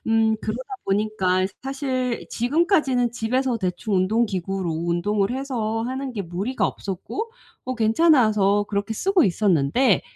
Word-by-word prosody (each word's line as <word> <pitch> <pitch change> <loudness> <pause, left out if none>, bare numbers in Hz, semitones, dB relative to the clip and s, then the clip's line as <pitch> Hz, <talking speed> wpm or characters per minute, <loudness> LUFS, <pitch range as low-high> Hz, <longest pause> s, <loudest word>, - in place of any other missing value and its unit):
음. 225 -1 +3
그러다 255 - -4
보니까 195 -2 +1 0.2
사실 260 -3 -2
지금까지는 270 - +2
집에서 245 +2 0
대충 190 +1 -2
운동기구로 190 -3 0
운동을 175 +6 0
해서 240 -4 -2
하는 260 +2 -4
게 205 - -3
무리가 190 +9 -1
없었고 390 - -5 0.3
어 255 0 -3
괜찮아서 220 -5 +3
그렇게 200 +1 -2
쓰고 375 - +3
있었는데 190 - +2
220 Hz, 305 characters per minute, -23 LUFS, 195-255 Hz, 0.3 s, 음